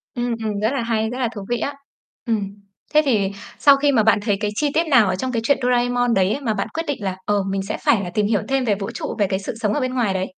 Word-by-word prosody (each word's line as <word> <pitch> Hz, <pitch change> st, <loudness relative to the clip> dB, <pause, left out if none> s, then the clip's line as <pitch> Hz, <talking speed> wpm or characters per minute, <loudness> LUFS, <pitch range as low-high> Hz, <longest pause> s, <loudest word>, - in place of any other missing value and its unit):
Ừm, 240 Hz, -1 st, -1 dB
ừm, 210 Hz, -2 st, -2 dB
rất 220 Hz, +5 st, 0 dB
là 270 Hz, -, -1 dB
hay, 220 Hz, -1 st, 0 dB
rất 245 Hz, -, -5 dB
là 250 Hz, -, +1 dB
thú 200 Hz, -, -6 dB
vị 240 Hz, -, +1 dB
á. 285 Hz, -, -2 dB, 0.5 s
Ừm. 205 Hz, -4 st, -1 dB, 0.4 s
Thế 305 Hz, -, +6 dB
thì 210 Hz, -8 st, +2 dB, 0.3 s
sau 280 Hz, -2 st, +6 dB
khi 285 Hz, +1 st, +2 dB
mà 225 Hz, -5 st, +3 dB
bạn 220 Hz, 0 st, +4 dB
thấy 205 Hz, -2 st, 0 dB
cái 210 Hz, -1 st, -1 dB
chi 295 Hz, +5 st, +1 dB
tiết 330 Hz, +1 st, +1 dB
nào 240 Hz, -8 st, +5 dB
ở 190 Hz, -, 0 dB
trong 255 Hz, +7 st, -3 dB
cái 230 Hz, -2 st, -1 dB
chuyện 280 Hz, -, +3 dB
Doraemon 245 Hz, -1 st, +2 dB
đấy 195 Hz, 0 st, +2 dB
á -, -, -3 dB
mà 225 Hz, -5 st, 0 dB
bạn 200 Hz, -, -2 dB
quyết 325 Hz, -, -2 dB
định 280 Hz, -8 st, -3 dB
là, 185 Hz, -1 st, -2 dB
ờ, 205 Hz, -1 st, +1 dB
mình 195 Hz, 0 st, -2 dB
sẽ 195 Hz, -, -4 dB
phải 205 Hz, -4 st, +3 dB
là 180 Hz, -, -4 dB
tìm 205 Hz, +4 st, 0 dB
hiểu 210 Hz, -1 st, +1 dB
thêm 270 Hz, -1 st, 0 dB
về 210 Hz, -3 st, +2 dB
vũ 195 Hz, 0 st, -5 dB
trụ, -, -, -5 dB
về 200 Hz, -, +3 dB
cái 190 Hz, 0 st, -1 dB
sự 195 Hz, -, -5 dB
sống 210 Hz, -2 st, 0 dB
ở -, -, 0 dB
bên 255 Hz, 0 st, -1 dB
ngoài 235 Hz, -6 st, +1 dB
đấy? 190 Hz, 0 st, -3 dB
225 Hz, 305 wpm, -21 LUFS, 200-255 Hz, 0.5 s, Thế